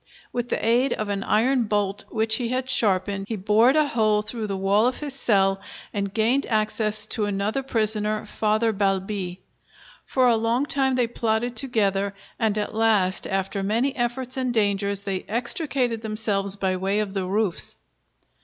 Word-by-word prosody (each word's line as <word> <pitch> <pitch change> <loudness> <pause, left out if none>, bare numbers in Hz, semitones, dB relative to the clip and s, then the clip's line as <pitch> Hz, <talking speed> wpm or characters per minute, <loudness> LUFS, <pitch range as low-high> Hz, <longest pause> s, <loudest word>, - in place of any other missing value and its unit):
With 245 -1 -2
the - - -1
aid 245 +3 +3
of 215 -1 -3
an 200 -1 -1
iron 240 +4 +2
bolt 205 -1 -1
which 220 -1 +2
he 240 - -2
had 255 +1 -2
sharpened, 200 -5 0
he 225 - -1
bored 215 +6 +3
a 305 -1 +3
hole 215 -2 +2
through 220 0 -3
the 195 -1 -3
wall 200 +4 +3
of 255 - -1
his 290 -2 -5
cell 195 -7 +2 0.3
and 200 -1 -2
gained 230 +6 +1
access 215 -1 0
to 215 - 0
another 205 +5 -1
prisoner, 215 -3 -1
Father 220 +1 +1
Balbi. 195 -2 -1 0.6
For 260 -1 +1
a 240 -2 +5
long 230 +4 +1
time 270 -2 +1
they 250 -1 +2
plotted 230 +1 -1
together, 200 -5 0 0.2
and 220 -2 +1
at 210 - -2
last 215 -4 +2
after 195 +1 -2
many 230 +7 0
efforts 255 +1 -2
and 255 -1 0
dangers 200 -3 0
they 195 -2 -3
extricated 245 - 0
themselves 210 -3 -1
by 190 -2 -1
way 195 +3 0
of 205 -2 -2
the 190 -2 -2
roofs. 200 -2 +1
215 Hz, 170 wpm, -24 LUFS, 200-240 Hz, 0.6 s, a